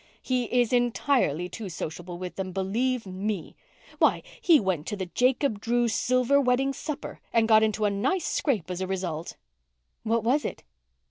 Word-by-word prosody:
He 255 -2 0
is 245 0 +1
entirely 240 - +1
too 195 +3 -7
sociable 175 +2 -6
with 180 0 -6
them, 190 -1 -4
believe 225 +6 -1
me. 190 -1 -4 0.4
Why, - - +3 0.2
he 330 -4 +6
went 185 - -1
to - - -2
the 190 - -3
Jacob 250 - +1
Drews' 235 0 +1
silver 255 +3 +3
wedding 270 +1 +2
supper 300 +1 -6
and 225 -1 +3
got 220 -1 +6
into 215 -1 +1
a 205 - +2
nice 270 - 0
scrape 205 - -1
as 180 +1 -4
a 185 - -1
result." 180 -4 -4 0.6
"What 225 0 0
was 265 +6 +2
it?" - - -5
220 Hz, 170 wpm, -27 LUFS, 185-250 Hz, 0.6 s, he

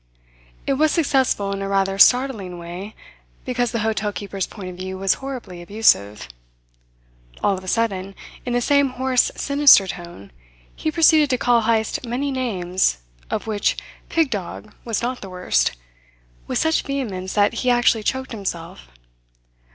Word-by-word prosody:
It - - +1
was 310 0 +4
successful 265 - +1
in 195 - -4
a 195 - -3
rather 195 0 0
startling 230 -8 +4
way, 175 +5 -8 0.5
because 245 -1 0
the 230 -2 -2
hotel 215 -1 -1
keeper's 200 -2 -4
point 190 -4 -8
of 180 - -11
view 190 +1 -5
was 195 0 +2
horribly 250 -10 -7
abusive. 170 - +1 1.2
All 200 - +3
of 190 - -8
a - - -11
sudden, 195 -3 -1 0.3
in 245 - -3
the 245 - +1
same 280 +1 +3
hoarse 255 0 +1
sinister 280 -8 +6
tone, 175 - -9 0.4
he 315 - -2
proceeded 310 -2 +4
to 255 - +1
call 240 -1 +3
Heyst 220 +1 0
many 255 +4 -2
names, 190 - 0 0.3
of - - -3
which 215 -2 0 0.3
"pig 325 -4 +1
dog" 210 +1 -6
was 230 -1 -2
not 250 +1 -2
the 195 - -8
worst, 180 - +1 0.7
with - - -1
such 320 0 +2
vehemence 205 -10 -4
that 205 -1 +3
he 255 - +1
actually 240 -2 +3
choked 260 +4 -2
himself. 170 - -6
220 Hz, 155 wpm, -21 LUFS, 190-255 Hz, 1.2 s, sinister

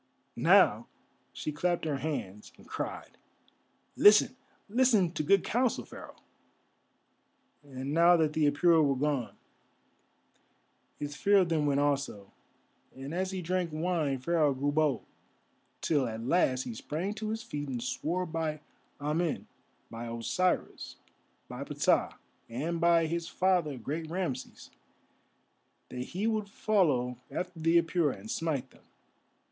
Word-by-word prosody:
Now - - +4 0.4
she 155 - -4
clapped 175 +3 -1
her 150 -3 -1
hands 120 -10 -5
and - - -17
cried: - - -6 0.8
"Listen, 210 +4 +6 0.3
listen 220 -6 +3
to 170 - -3
good 195 +5 +3
counsel, 245 +1 0
Pharaoh." - - -11 1.5
And 135 0 -6
now 170 +2 +6
that 155 -2 +1
the 150 -2 +3
Apura 160 +2 +4
were 140 -2 +2
gone, 140 -3 -1 1.6
his 145 0 -5
fear 200 +7 +3
of 185 -3 +3
them 155 -3 +1
went 140 0 +2
also, 140 -9 -1 0.6
and 135 +3 -7
as 185 +2 -1
he 185 -1 -4
drank 180 0 -1
wine 155 -3 -1
Pharaoh 150 +1 +1
grew 140 +2 0
bold, 150 -2 +1 0.8
till 145 -5 +1
at 110 0 -5
last 130 -4 +2
he 120 - -6
sprang 160 - -4
to 215 0 -5
his 225 +1 -3
feet 145 - -5
and 125 -2 -3
swore 175 +8 -2
by 160 -2 -3 0.4
Amen, 155 +3 -1 0.5
by 115 +1 -6
Osiris, 115 +11 -1 0.5
by - - -6
Ptah, - - +1 0.3
and 160 +8 -3
by 170 -1 +4
his 170 +1 -3
father—great 160 -4 -1
Rameses—that 160 -6 -9
he 180 +11 -4
would 215 -2 -1
follow 145 - +1
after 180 -2 -5
the 165 +2 +4
Apura 165 - 0
and 110 +3 -8
smite 145 -6 -2
them. - - -21
155 Hz, 130 wpm, -30 LUFS, 140-180 Hz, 1.6 s, Listen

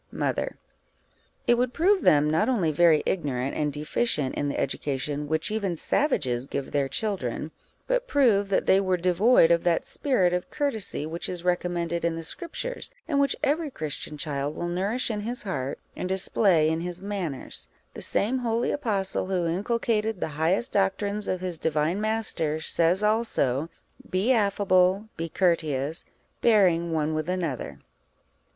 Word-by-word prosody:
Mother. - - -2 0.9
It 240 0 +4
would 250 0 0
prove 380 +3 +3
them 150 0 +5
not 160 +9 +2
only 190 -11 +2
very 160 0 +4
ignorant, 135 -6 -1
and 150 -1 0
deficient 150 - -1
in 145 - -1
the - - -3
education 145 +2 -2
which 160 +5 0
even 200 -6 -1
savages 130 - 0
give 140 -1 -4
their 140 -2 0
children, 160 - -2 0.3
but - - 0
prove 225 - +3
that 195 - +1
they 195 - +5
were 185 -2 +1
devoid 180 +1 +4
of 170 0 +3
that 170 -2 +1
spirit 190 -11 +1
of 180 0 -2
courtesy 225 - -2
which 165 +2 -4
is 180 -2 -5
recommended 175 -1 -1
in 170 -1 +1
the 165 - -5
Scriptures, 375 - -4 0.2
and 290 -3 +1
which 280 0 +2
every 300 +2 +1
Christian 155 - -5
child 145 -1 -2
will 175 - -3
nourish 200 +8 0
in 210 - -2
his 235 +3 -4
heart 140 -10 -3 0.2
and 180 - -4
display 190 -3 +3
in 160 +1 0
his 175 +1 -4
manners: 190 -8 -4 0.3
the - - -8
same 245 +6 0
holy 235 -1 0
apostle, 205 -10 -1
who 185 -2 0
inculcated 215 +3 0
the - - -2
highest 160 +9 0
doctrines 200 +1 0
of 185 -1 -1
his 180 -3 -3
Divine 160 +5 0
Master, 215 -8 -1
says 170 +5 +2
also 165 - +1 0.4
"Be 190 +7 +1
affable, 200 -2 +2
be 165 0 -4
courteous, 160 -4 0 0.4
bearing 180 -7 +4
one 155 -1 0
with 155 +2 -2
another." 155 - -3
180 Hz, 160 wpm, -26 LUFS, 155-215 Hz, 0.9 s, them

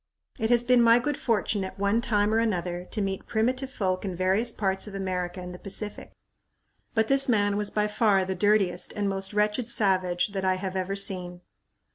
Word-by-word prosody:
It 220 - 0
has 240 -1 +4
been 250 0 +4
my 230 0 +6
good 290 +4 -1
fortune 215 -5 0
at 190 +1 -7
one 200 +3 +1
time 210 -2 +1
or 225 - +3
another 180 -5 -1
to 215 - -3
meet 195 -1 -4
primitive 255 +4 0
folk 185 -8 -2
in 190 -3 -4
various 190 +6 +1
parts 195 -2 -1
of 200 - -8
America 185 -2 -3
and 180 0 -7
the 180 - -10
Pacific, 205 +1 -6 0.8
but 220 -1 +2
this 275 0 +4
man 205 -3 +2
was 205 0 0
by 210 0 0
far 210 -3 +2
the 190 - -2
dirtiest 190 -2 +1
and 205 -1 -1
most 195 -1 -2
wretched 210 +3 0
savage 185 -4 +1
that 195 -1 -4
I 185 0 +2
have 185 0 -5
ever 190 +1 -2
seen. 180 -3 -2
200 Hz, 200 wpm, -26 LUFS, 185-220 Hz, 0.8 s, my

